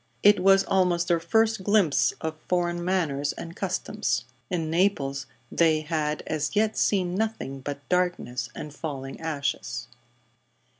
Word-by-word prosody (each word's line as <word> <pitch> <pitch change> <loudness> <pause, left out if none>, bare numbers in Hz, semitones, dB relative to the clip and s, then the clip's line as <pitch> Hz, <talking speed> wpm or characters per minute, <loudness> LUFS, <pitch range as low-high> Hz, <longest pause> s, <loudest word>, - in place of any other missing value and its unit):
It 205 0 +7
was 195 +1 +5
almost 180 -3 +2
their 170 -1 +3
first 220 +4 +2
glimpse 200 -7 +3
of 160 0 -3
foreign 175 -1 0
manners 155 -6 0
and 170 0 -8
customs. 195 - -1 0.2
In 165 -3 -1
Naples 140 -7 +1 0.2
they 160 -2 +3
had 155 -1 -2
as 155 +4 -2
yet 215 +1 +2
seen 185 -3 +1
nothing 205 -10 -2
but 140 +1 -6
darkness 175 -10 0
and 150 - -7
falling 135 -3 -6
ashes. 135 -6 -3
170 Hz, 135 wpm, -26 LUFS, 145-190 Hz, 0.2 s, It